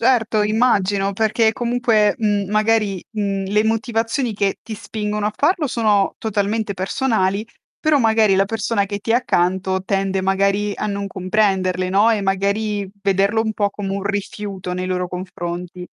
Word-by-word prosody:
Certo, 225 Hz, -4 st, +2 dB
immagino 205 Hz, -3 st, +2 dB
perché 220 Hz, +2 st, +2 dB
comunque, 235 Hz, -3 st, +2 dB
mhmm, 205 Hz, -3 st, 0 dB
magari, 215 Hz, -3 st, +1 dB
mhmm, 200 Hz, -3 st, -2 dB
le 210 Hz, +2 st, +2 dB
motivazioni 225 Hz, +2 st, 0 dB
che 200 Hz, -1 st, 0 dB
ti 220 Hz, -, -6 dB
spingono 210 Hz, -1 st, -3 dB
a 210 Hz, -, -1 dB
farlo 315 Hz, +1 st, +2 dB
sono 215 Hz, -5 st, +2 dB
totalmente 215 Hz, 0 st, -1 dB
personali, 195 Hz, +1 st, 0 dB, 0.3 s
però 310 Hz, -2 st, +3 dB
magari 220 Hz, -4 st, +4 dB
la 195 Hz, -, +3 dB
persona 220 Hz, -1 st, 0 dB
che 205 Hz, 0 st, -4 dB
ti 220 Hz, -, -5 dB
è -, -, +4 dB
accanto 190 Hz, -4 st, +1 dB
tende 195 Hz, -1 st, 0 dB
magari 200 Hz, +2 st, +1 dB
a -, -, -3 dB
non 200 Hz, -1 st, -3 dB
comprenderle, 185 Hz, -1 st, 0 dB
no, 200 Hz, +5 st, +4 dB
e 220 Hz, -3 st, +1 dB
magari 200 Hz, +1 st, -1 dB
vederlo 200 Hz, +3 st, +2 dB
un 220 Hz, -, -2 dB
po' 205 Hz, -1 st, 0 dB
come 195 Hz, -1 st, -5 dB
un 195 Hz, 0 st, -3 dB
rifiuto 200 Hz, -2 st, -4 dB
nei 180 Hz, 0 st, -3 dB
loro 180 Hz, -1 st, -1 dB
confronti. 180 Hz, 0 st, -6 dB
205 Hz, 160 wpm, -20 LUFS, 195-220 Hz, 0.3 s, magari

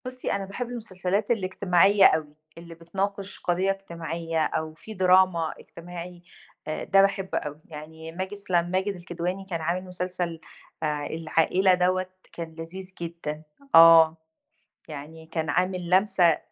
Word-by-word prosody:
بُصّي، 255 Hz, 0 st, -4 dB
أنا 200 Hz, -1 st, -1 dB
باحب 235 Hz, +5 st, -5 dB
المسلسلات 205 Hz, -3 st, -2 dB
الاجتماعية 190 Hz, -1 st, +3 dB
أوي، 150 Hz, -3 st, +3 dB, 0.2 s
اللي 170 Hz, 0 st, -11 dB
بتناقش 195 Hz, +4 st, -4 dB
قضية 185 Hz, +2 st, +1 dB
اجتماعية 170 Hz, -3 st, -4 dB
أو 155 Hz, 0 st, -2 dB
في 220 Hz, +7 st, -11 dB
دراما 185 Hz, -3 st, +3 dB
اجتماعي، 175 Hz, +1 st, -10 dB, 0.4 s
آآ، 155 Hz, -, -3 dB
ده 195 Hz, +2 st, +5 dB
باحبه 195 Hz, -1 st, 0 dB
أوي. 150 Hz, +1 st, -5 dB
يعني 160 Hz, +1 st, -9 dB
ماجد 185 Hz, +4 st, -5 dB
سل 175 Hz, -3 st, -1 dB
ماجد 190 Hz, +2 st, 0 dB
الكدواني 175 Hz, +2 st, -4 dB
كان 170 Hz, -4 st, -4 dB
عامل 170 Hz, +3 st, -1 dB
مسلسل 180 Hz, -2 st, -4 dB, 0.4 s
آآ، 150 Hz, -1 st, -1 dB
العائلة 165 Hz, +4 st, +2 dB
دوّة 185 Hz, +1 st, +2 dB, 0.3 s
كان 165 Hz, -1 st, -7 dB
لذيذ 185 Hz, +3 st, -8 dB
جدًا. 165 Hz, -3 st, -5 dB, 0.3 s
آه. 165 Hz, -1 st, +8 dB, 0.7 s
يعني 155 Hz, +2 st, -9 dB
كان 160 Hz, -1 st, -3 dB
عامل 180 Hz, +2 st, 0 dB
لمسة 185 Hz, -3 st, +4 dB
175 Hz, 135 wpm, -26 LUFS, 165-190 Hz, 0.7 s, آه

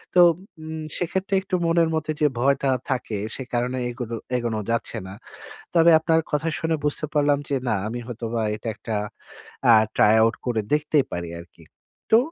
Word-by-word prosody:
তো 180 Hz, -, +8 dB, 0.4 s
উম 160 Hz, 0 st, -5 dB
সেক্ষেত্রে 190 Hz, +3 st, -1 dB
একটু 190 Hz, -1 st, -2 dB
মনের 165 Hz, 0 st, +3 dB
মধ্যে, 155 Hz, 0 st, -1 dB
যে 150 Hz, -, +6 dB
ভয়টা 135 Hz, +1 st, +2 dB, 0.2 s
থাকে 125 Hz, -5 st, -2 dB, 0.2 s
সে 130 Hz, -, -5 dB
কারণে 125 Hz, +2 st, 0 dB
এগোনো 120 Hz, -1 st, -5 dB, 0.2 s
এগোনো 115 Hz, -3 st, -2 dB
যাচ্ছে 115 Hz, -, -2 dB
না। 95 Hz, -, -8 dB, 0.6 s
তবে 170 Hz, 0 st, +7 dB
আপনার 160 Hz, 0 st, +2 dB
কথা 150 Hz, +2 st, 0 dB
শুনে 160 Hz, 0 st, 0 dB
বুঝতে 150 Hz, +1 st, -1 dB
পারলাম 145 Hz, -1 st, +3 dB
যে 140 Hz, -, +1 dB
না 110 Hz, -, +2 dB
আমি 120 Hz, +2 st, -4 dB
হয়তোবা 115 Hz, -1 st, -3 dB
এটা 110 Hz, -, -8 dB
একটা 110 Hz, 0 st, -5 dB, 0.8 s
আ -, -, +9 dB, 0.2 s
ট্রাই 105 Hz, -, +5 dB
আউট 115 Hz, 0 st, +2 dB
করে 115 Hz, -3 st, 0 dB
দেখতেই 150 Hz, -2 st, +2 dB
পারি 85 Hz, -1 st, -4 dB
আরকি। 85 Hz, -2 st, -18 dB, 0.5 s
তো 220 Hz, -, +8 dB
140 Hz, 170 wpm, -24 LUFS, 115-160 Hz, 0.8 s, আ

